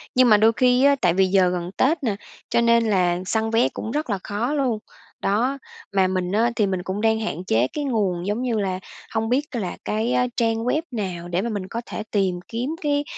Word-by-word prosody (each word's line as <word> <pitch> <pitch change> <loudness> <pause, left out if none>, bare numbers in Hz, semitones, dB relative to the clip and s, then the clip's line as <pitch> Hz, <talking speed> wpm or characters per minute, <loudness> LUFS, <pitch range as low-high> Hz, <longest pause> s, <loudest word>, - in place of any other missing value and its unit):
Nhưng 255 -1 +5
mà 210 - +7
đôi 220 +2 +5
khi 250 0 +4
á, 280 0 +6
tại 175 - +3
vì 190 +1 +4
giờ 185 -1 +4
gần 180 0 -3
Tết 310 +3 +2
nè, 220 -5 0 0.3
cho 235 - +2
nên 235 0 +4
là 180 -3 +2
săn 220 +3 0
vé 225 +2 +3
cũng 220 - -6
rất 300 +1 -2
là 200 -3 -1
khó 220 +7 -2
luôn. 260 -7 0 0.4
Đó, 240 +8 +1 0.4
mà 190 -1 +3
mình 185 -1 -1
á, 225 +4 +2
thì 210 - +2
mình 185 -2 -2
cũng 190 +3 -3
đang 220 0 +2
hạn 180 -6 -3
chế 115 -5 +2
cái 295 - -2
nguồn, 200 -9 -1
giống 210 +4 -1
như 240 -4 0
là, 190 -2 -1 0.3
hông 225 0 0
biết 265 +4 +1
là 195 -7 -3
cái 220 +3 0
á, 250 - +2
trang 225 -1 +1
web 295 +5 +1
nào 185 -7 -4
để 175 +1 -1
mà 235 - -2
mình 200 -4 -4
có 230 +4 -4
thể 215 - -5
tìm 190 -4 +1
kiếm 240 +4 -3
cái, 290 -1 +1
220 Hz, 235 wpm, -23 LUFS, 190-240 Hz, 0.4 s, mà